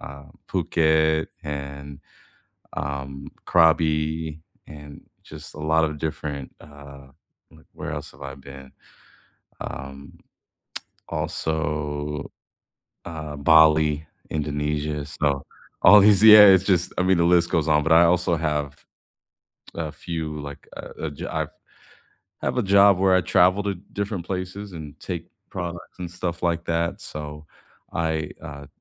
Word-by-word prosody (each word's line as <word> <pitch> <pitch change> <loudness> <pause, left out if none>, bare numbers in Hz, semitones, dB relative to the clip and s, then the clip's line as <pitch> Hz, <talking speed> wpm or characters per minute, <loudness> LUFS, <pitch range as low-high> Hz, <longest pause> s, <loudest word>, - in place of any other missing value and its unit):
uh, 70 +1 -10 0.2
Phuket 80 -3 +2 0.2
and, 70 -1 -7 0.8
um, 70 0 -5 0.2
Krabi 80 -1 +2 0.3
and 75 -1 -11 0.2
just - - -12
a - - -11
lot 80 +1 +2
of 75 -1 -3
different, 75 -3 -5
uh 70 -2 -13 0.4
like, - - -19
where - - -6
else - - -6
have 65 - -16
I 70 0 -6
been? 70 -1 -13 0.9
Um 70 +1 -8 0.9
also, 75 -2 -3 0.7
um, 75 -3 -7
Bali, 80 0 +5 0.2
Indonesia. 75 0 -2
So, 70 -2 -1 0.4
all 105 +3 +9
these 100 0 +5
yeah, 105 -1 +11
it's 95 -2 +6
just 90 -3 +1
I - - +3
mean, 95 -1 +3
the 85 - +3
list 85 0 +3
goes 80 -1 +1
on. 75 -1 +3
But 80 - +1
I 85 +1 +7
also 90 0 +2
have 75 -3 -3 0.9
a 80 -2 -4
few, 80 -2 -5
like, 70 0 -10
uh, - - -8
a 80 -2 -3
jo 70 - -7
I've - - -2 0.9
I - - -3
have - - -1
a - - +2
job 100 -1 +5
where 95 0 +4
I 95 - +5
travel 90 +3 +3
to 100 -1 -1 0.2
different 100 -3 -4
places 95 +1 -5
and 75 -4 -9
take - - -6 0.2
products 85 0 -7
and 90 -2 -5
stuff 90 -1 -5
like 85 -1 0
that. 85 0 -1
So, 75 0 -8 0.5
I, 80 -2 -1
uh 70 -1 -9
80 Hz, 135 wpm, -24 LUFS, 75-85 Hz, 0.9 s, yeah